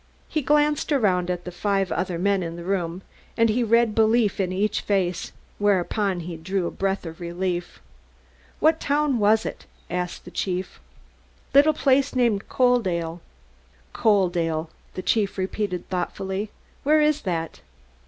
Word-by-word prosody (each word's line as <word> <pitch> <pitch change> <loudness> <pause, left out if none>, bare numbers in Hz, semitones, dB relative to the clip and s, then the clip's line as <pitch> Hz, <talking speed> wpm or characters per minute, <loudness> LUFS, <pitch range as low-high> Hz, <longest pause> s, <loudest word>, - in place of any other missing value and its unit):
He 310 - -1
glanced 295 +2 +2
around 185 -10 +2
at 180 -1 -3
the 180 - -5
five 195 +1 0
other 180 -2 -1
men 195 +2 +1
in 165 -1 -4
the 170 - -7
room, 180 -1 -2 0.3
and 230 -1 +4
he 240 +3 +2
read 230 0 +3
belief 220 -1 +3
in 185 -2 0
each 205 +3 0
face, 185 -3 -1 0.3
whereupon 200 -1 +1
he 170 0 -6
drew 185 +3 -2
a - - -2
breath 195 -1 -2
of 165 0 -8
relief. 175 0 -3 0.8
"What 315 +1 +4
town 285 -3 +1
was 215 +1 +3
it?" - - -6 0.2
asked 180 0 -3
the - - -10
chief. 185 -1 -3 0.7
"Little 290 +3 +6
place 275 -1 +2
named 235 -5 +1
Coaldale." 185 -10 +1 0.7
"Coaldale," 175 -7 +1 0.3
the 185 - -4
chief 205 -1 +1
repeated 190 -1 -2
thoughtfully. 190 +2 -3 0.3
"Where 305 +2 +4
is 300 0 +2
that?" 165 -4 -3
195 Hz, 145 wpm, -24 LUFS, 180-230 Hz, 0.8 s, Little